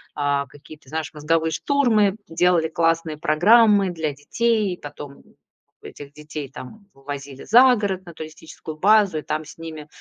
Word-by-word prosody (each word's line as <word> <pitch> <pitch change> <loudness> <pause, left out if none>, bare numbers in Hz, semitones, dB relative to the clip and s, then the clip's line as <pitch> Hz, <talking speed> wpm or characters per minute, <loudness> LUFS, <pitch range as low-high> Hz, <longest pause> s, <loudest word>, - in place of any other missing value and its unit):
а, 145 -1 0
какие-то, 145 0 -16
знаешь, 160 0 -4
мозговые 155 +2 +1
штурмы, 220 - +2
делали 170 -1 +2
классные 165 -1 0
программы 200 +6 +4
для 160 -3 -3
детей. 210 +5 -1
Потом 145 -1 -10 0.6
этих 140 -1 -11
детей, 150 -2 -8
там, 200 +10 -11
увозили 135 0 -8
за 250 +3 +6
город, 190 -3 -3
на 170 - -11
туристическую 155 0 -10
базу, 200 -3 +3
и - - -7
там 155 +1 -4
с - - -13
ними, 160 -2 -9
160 Hz, 145 wpm, -22 LUFS, 150-200 Hz, 0.6 s, за